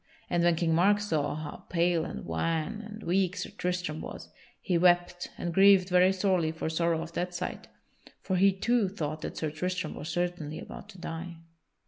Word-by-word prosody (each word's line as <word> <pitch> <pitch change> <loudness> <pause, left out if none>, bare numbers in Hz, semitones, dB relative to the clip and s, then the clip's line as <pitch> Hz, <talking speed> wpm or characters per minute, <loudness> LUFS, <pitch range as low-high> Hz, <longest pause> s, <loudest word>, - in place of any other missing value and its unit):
And 175 -1 +2
when 175 -1 +4
King 165 0 +1
Mark 200 +5 +4
saw 155 -8 -1
how 155 -1 -7
pale 170 -1 +2
and - - -6
wan 165 - -1
and 215 0 -9
weak 185 +2 +1
Sir 180 - -4
Tristram 180 -3 -2
was, - - -8 0.3
he 180 - -1
wept 175 0 +3
and 175 - -3
grieved 195 0 +6
very 180 +1 +5
sorely 185 -4 +1
for 160 0 -3
sorrow 165 0 +1
of 170 0 -10
that 180 +1 -2
sight, 180 +1 -4 0.5
for 190 - -2
he 195 +2 +5
too 215 +2 +1
thought 155 -5 -4
that - - -5
Sir 155 -2 -2
Tristram 180 +1 -3
was 155 - -7
certainly 175 -3 -2
about - - -9
to 195 - -12
die. 170 +1 -6
175 Hz, 185 wpm, -29 LUFS, 165-185 Hz, 0.5 s, grieved